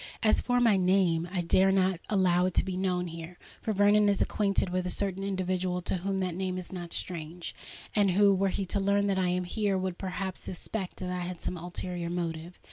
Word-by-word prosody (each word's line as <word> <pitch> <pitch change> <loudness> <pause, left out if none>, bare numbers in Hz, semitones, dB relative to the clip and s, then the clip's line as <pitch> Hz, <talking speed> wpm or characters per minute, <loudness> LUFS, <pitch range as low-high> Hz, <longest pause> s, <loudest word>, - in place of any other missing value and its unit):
As 215 - +4
for 245 0 +1
my 230 -5 +4
name—I 180 -1 +2
dare 190 +3 +4
not 190 -2 +2
allow 180 -3 +3
it 185 - -4
to - - +4
be 190 -1 -3
known 180 -1 0
here; 165 +1 -8 0.2
for 220 - -1
Vernon 205 +1 +4
is 200 - +1
acquainted 200 -3 +1
with 180 0 -1
a - - -1
certain 195 0 0
individual 185 -2 -1
to 185 - -1
whom 195 +2 -2
that 185 -2 -1
name 185 +1 -2
is 180 -2 -6
not 175 -2 -6
strange, 170 0 -3 0.4
and 205 -2 +4
who, 200 +2 +5
were 195 +1 +2
he 195 +1 -2
to 200 +2 -1
learn 200 +1 +2
that 195 -1 +1
I 185 - +2
am 180 0 0
here, 200 +2 0
would 185 -1 -3
perhaps 190 0 -3
suspect 185 +1 -4
that 180 -1 -4
I 180 - -2
had 175 0 -5
some - - -3
ulterior 175 0 -4
motive. 170 0 -4
185 Hz, 215 wpm, -29 LUFS, 180-195 Hz, 0.4 s, who